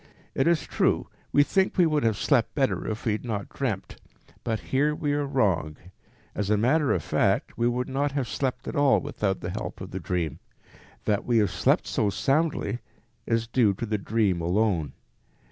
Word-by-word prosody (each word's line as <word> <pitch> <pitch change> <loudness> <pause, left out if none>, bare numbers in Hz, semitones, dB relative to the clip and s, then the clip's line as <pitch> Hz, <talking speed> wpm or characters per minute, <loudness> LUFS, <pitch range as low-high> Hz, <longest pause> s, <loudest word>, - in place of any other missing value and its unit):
It 135 - +1
is 170 -3 +3
true, - - +1 0.2
we 145 - +5
think 190 +6 +1
we 180 - +6
would 155 -2 +2
have 110 -3 +2
slept - - +1
better - - 0
if 110 +1 -4
we 115 - +2
had 105 - -2
not 105 -5 -3
dreamt, 105 -9 -4 0.4
but 110 -2 -1
here 150 +3 +3
we 145 -2 -1
are 145 -1 0
wrong; 95 - +1 0.6
as 100 -1 -2
a 105 - +3
matter 135 +7 +2
of 85 - 0
fact, - - +1
we 120 - +1
would 125 +1 -1
not 140 +1 -1
have 135 -4 -1
slept 125 +5 -3
at - - -4
all 145 -2 +4
without 105 -9 -2
the - - -4
help - - -5
of - - -8
the - - -4
dream. 85 -4 -2 0.7
That 105 -1 +1
we 120 -1 +2
have 105 -2 +3
slept - - +2
so 105 - 0
soundly 140 +1 0 0.5
is 115 -1 +1
due 115 -4 +2
to 115 - -4
the 105 -1 -1
dream 100 -4 +1
alone. 85 - +1
115 Hz, 195 wpm, -26 LUFS, 100-140 Hz, 0.7 s, we